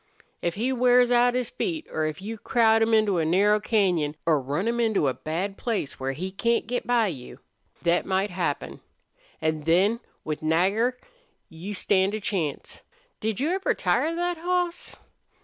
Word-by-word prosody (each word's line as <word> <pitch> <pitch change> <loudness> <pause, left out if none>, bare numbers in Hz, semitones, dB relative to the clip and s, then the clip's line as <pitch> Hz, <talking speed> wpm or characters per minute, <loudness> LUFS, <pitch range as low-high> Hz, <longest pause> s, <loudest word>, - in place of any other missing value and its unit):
If 170 0 -1
he 245 +5 0
wears 250 0 +4
out 245 0 +4
his 250 -2 -1
feet, 325 -4 -3
or 155 - -1
if 155 +4 -4
you 220 +1 -6
crowd 225 -2 +3
him 225 +1 +2
into 215 -5 +3
a - - +1
narrow 200 +6 +3
cañon, 180 -9 +1
or 155 -4 +3
run 145 - -2
him 235 +1 0
into 220 -10 +2
a 130 - +1
bad 180 +8 -4
place 220 - -3
where 135 0 -2
he 185 +7 -5
can't 230 +4 0
get 245 +2 -3
by 240 -2 +3
you. 140 -11 -6 0.4
Thet 170 0 +2
might 190 +1 0
happen. 175 -5 -3 0.6
An' 155 -1 0
then, 185 +9 +2 0.2
with 155 -1 -4
Nagger, 195 +10 +1 0.5
you 180 +6 -7
stand 195 +1 +1
a - - -3
chance. 180 -8 -3 0.4
Did 220 -2 -2
you 300 +6 0
ever 380 +1 0
tire 330 +1 +1
thet 350 0 -1
hoss?" 355 0 -2
205 Hz, 175 wpm, -25 LUFS, 170-240 Hz, 0.6 s, wears